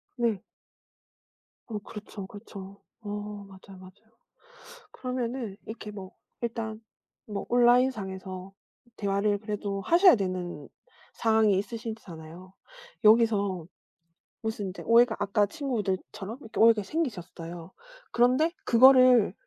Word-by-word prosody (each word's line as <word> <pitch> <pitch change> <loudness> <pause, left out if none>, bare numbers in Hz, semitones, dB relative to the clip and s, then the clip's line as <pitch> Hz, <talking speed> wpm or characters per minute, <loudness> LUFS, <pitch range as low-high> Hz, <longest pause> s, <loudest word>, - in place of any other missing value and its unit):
네. 230 -6 0 1.2
어 215 -3 -4
그렇죠, 205 -1 -9
그렇죠. 200 -1 -11 0.2
어 205 - -8 0.4
맞아요, 190 0 -14
맞아요. 185 0 -12 1.0
그러면은 250 -4 -4
이렇게 220 -1 -7
뭐 195 -2 -9 0.3
일단 225 -2 -4 0.5
뭐 205 -2 -4
온라인상에서 200 -7 +1 0.4
대화를 205 0 0
그래도 205 -2 -4
하셔야 350 - +6
되는 185 -6 -4 0.5
상황이 220 -3 +3
있으시잖아요. 190 -6 -7 0.5
여기서 210 -6 +4 0.8
무슨 220 -3 -3
인제 185 - -7
오해가 230 0 +5
아까 205 +1 +2
친구들처럼 215 - -4
이렇게 225 - -7
오해가 225 -2 +6
생기셨어요. 175 - -5 0.4
그런데 255 +7 +3
그거를 255 -3 +6
210 Hz, 265 characters per minute, -28 LUFS, 190-235 Hz, 1.2 s, 하셔야